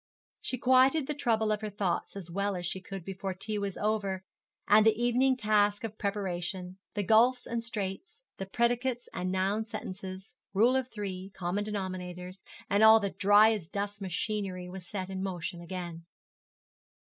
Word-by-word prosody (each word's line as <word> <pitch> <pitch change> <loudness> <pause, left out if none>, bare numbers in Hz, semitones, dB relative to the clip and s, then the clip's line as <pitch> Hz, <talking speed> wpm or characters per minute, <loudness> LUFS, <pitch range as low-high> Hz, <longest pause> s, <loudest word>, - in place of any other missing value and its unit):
She 255 - -2
quieted 260 +4 +4
the 300 - -2
trouble 225 -6 +1
of 210 0 0
her 215 - -3
thoughts 200 -3 -2
as 180 -4 -7
well 200 +2 -1
as 175 -1 -4
she 185 +2 -3
could 190 -2 -7
before 195 0 -4
tea 210 +3 -2
was 200 -2 -3
over 200 -3 -1 0.4
and 210 +1 +7
the 220 0 +4
evening 250 +2 +3
task 210 -2 +2
of 215 -1 -6
preparation, 185 -2 -3 0.2
the 205 - 0
gulfs 240 +5 +4
and 235 0 -2
straits, 230 - -5
the 195 - -5
predicates 240 +3 0
and 185 0 -2
noun 195 +3 +1
sentences, 195 -2 -7 0.2
rule 235 +6 +5
of 260 -2 +1
three, 195 -4 -5
common 185 +3 -1
denominators, 185 -2 -5 0.3
and 200 +1 +2
all 220 0 +9
the 200 -2 -2
dry 205 +2 +6
as 200 -7 -4
dust 205 +2 -4
machinery 190 -1 -3
was 180 -1 -8
set 190 -2 -4
in 190 0 -3
motion 175 -2 -4
again. 170 -1 -6
200 Hz, 170 wpm, -30 LUFS, 185-220 Hz, 0.4 s, all